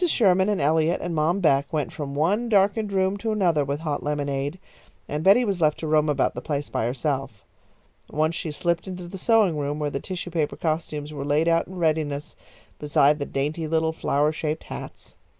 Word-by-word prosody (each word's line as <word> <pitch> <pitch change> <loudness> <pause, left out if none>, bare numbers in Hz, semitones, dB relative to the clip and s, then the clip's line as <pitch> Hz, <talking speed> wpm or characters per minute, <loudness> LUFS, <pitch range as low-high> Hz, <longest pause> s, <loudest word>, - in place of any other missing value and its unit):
Sherman 190 - +3
and 205 - 0
Eliot 160 +3 +2
and 175 - -4
Mom 165 +5 +1
Beck 140 -4 +2
went 150 -3 -2
from 140 -2 -5
one 200 +11 +1
darkened 205 0 +2
room 190 0 +1
to 220 +2 -2
another 175 -8 +2
with 140 +2 -3
hot 150 -3 -2
lemonade, 145 +1 -2 0.5
and 150 +1 -3
Betty 205 +7 +6
was 195 -5 -1
left 155 -1 +3
to - - -6
roam 155 0 +2
about 145 - +1
the - - -6
place 145 -2 -3
by 110 - 0
herself. 130 -4 -3 0.6
Once 155 +2 0
she 165 - -4
slipped 170 +4 -1
into 180 -2 -6
the 190 +2 -8
sewing 210 -7 +3
room 145 +1 -2
where 150 -1 -2
the 140 - -2
tissue 180 0 -6
paper 155 -3 -1
costumes 155 -2 -3
were 140 -2 -4
laid 145 +3 +1
out 165 0 +2
in 190 - -10
readiness 155 -4 -1 0.4
beside 150 0 +3
the 140 - -3
dainty 150 +4 -2
little 160 0 +1
flower 150 -1 +1
shaped 155 0 -3
hats. - - -9
155 Hz, 200 wpm, -24 LUFS, 145-180 Hz, 0.6 s, Betty